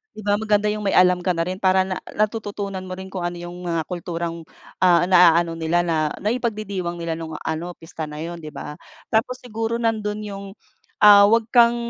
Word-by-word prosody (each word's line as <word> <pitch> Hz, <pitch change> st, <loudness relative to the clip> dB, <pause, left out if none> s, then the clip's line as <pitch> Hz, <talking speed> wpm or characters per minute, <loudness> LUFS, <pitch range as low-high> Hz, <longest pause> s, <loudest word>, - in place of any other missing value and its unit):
'di 215 Hz, -, -8 dB
ba 205 Hz, 0 st, +2 dB
maganda 210 Hz, -1 st, +1 dB
yung 210 Hz, -1 st, -4 dB
may -, -, +1 dB
alam 180 Hz, 0 st, +5 dB
ka 180 Hz, -, +2 dB
na 165 Hz, -, 0 dB
rin 185 Hz, +2 st, -4 dB
para 190 Hz, -1 st, +3 dB
na 185 Hz, -1 st, -4 dB, 0.2 s
natututunan 205 Hz, -3 st, -2 dB
mo 185 Hz, -, -5 dB
rin 190 Hz, 0 st, -9 dB
kung 185 Hz, -2 st, -4 dB
ano 175 Hz, -, -5 dB
yung 175 Hz, +1 st, -8 dB
mga 165 Hz, -1 st, 0 dB
kulturang, 170 Hz, -1 st, -4 dB, 0.3 s
ah, 175 Hz, -2 st, +5 dB
naa-ano 170 Hz, -2 st, +5 dB
nila 165 Hz, +2 st, +1 dB
na 155 Hz, -3 st, 0 dB
naipagdidiwang 210 Hz, -6 st, -2 dB
nila 165 Hz, -1 st, -3 dB
nung 160 Hz, -1 st, -6 dB
ano 165 Hz, +3 st, -3 dB
pista 165 Hz, -1 st, -7 dB
na 150 Hz, 0 st, -7 dB
yun 170 Hz, +1 st, -6 dB
'di 155 Hz, -2 st, -9 dB
ba? 150 Hz, 0 st, -7 dB, 0.3 s
Tapos 245 Hz, +3 st, +1 dB
siguro 225 Hz, -1 st, -3 dB
nandun 215 Hz, -2 st, -1 dB
yung, 200 Hz, -1 st, -7 dB, 0.6 s
ah, 205 Hz, -1 st, +9 dB
wag 230 Hz, +2 st, +3 dB
kang 235 Hz, -1 st, +5 dB
185 Hz, 195 wpm, -22 LUFS, 170-210 Hz, 0.6 s, ah